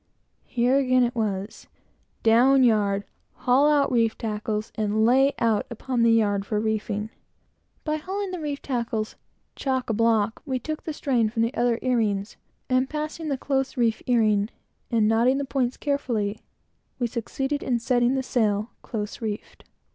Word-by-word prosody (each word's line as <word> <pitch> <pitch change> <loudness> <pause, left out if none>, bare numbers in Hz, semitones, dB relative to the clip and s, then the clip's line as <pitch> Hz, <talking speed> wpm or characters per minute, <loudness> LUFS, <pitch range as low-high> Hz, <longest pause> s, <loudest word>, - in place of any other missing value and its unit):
Here 250 +2 +2
again 255 -2 +3
it 240 0 0
was 205 -3 -3 0.6
down 255 +4 +5
yard, 205 -4 +2 0.3
haul 265 +4 +3
out 285 -2 +3
reef 230 -2 +2
tackles, 215 0 -3
and 215 0 +1
lay 270 +4 +4
out 225 -3 +1
upon 240 +1 -2
the 230 0 +5
yard 205 -3 +2
for 210 +1 -1
reefing. 215 0 -2 0.7
By 305 0 -1
hauling 385 +5 -4
the 365 - -4
reef 290 -2 -4
tackles 235 -4 -2 0.4
chock 260 -3 -1
a - - 0
block, 225 -1 +1
we 265 -3 -2
took 310 +5 -5
the 315 - -3
strain 245 -7 +1
from 225 +1 0
the 230 - -1
other 240 -1 +1
earings, 220 -5 0 0.3
and 255 0 +1
passing 310 +1 -4
the 275 - 0
close 270 0 -1
reef 230 -2 +1
earing, 215 -4 +3 0.4
and 225 -3 +2
knotting 235 +4 +3
the 280 - -2
points 260 -2 -1
carefully, 230 -8 -1 0.6
we 245 - 0
succeeded 270 +5 -3
in 245 -2 0
setting 245 +2 +2
the 265 - -1
sail, 215 -3 0
close 210 -1 -5
reefed. 215 -2 -6
235 Hz, 160 wpm, -25 LUFS, 220-265 Hz, 0.7 s, down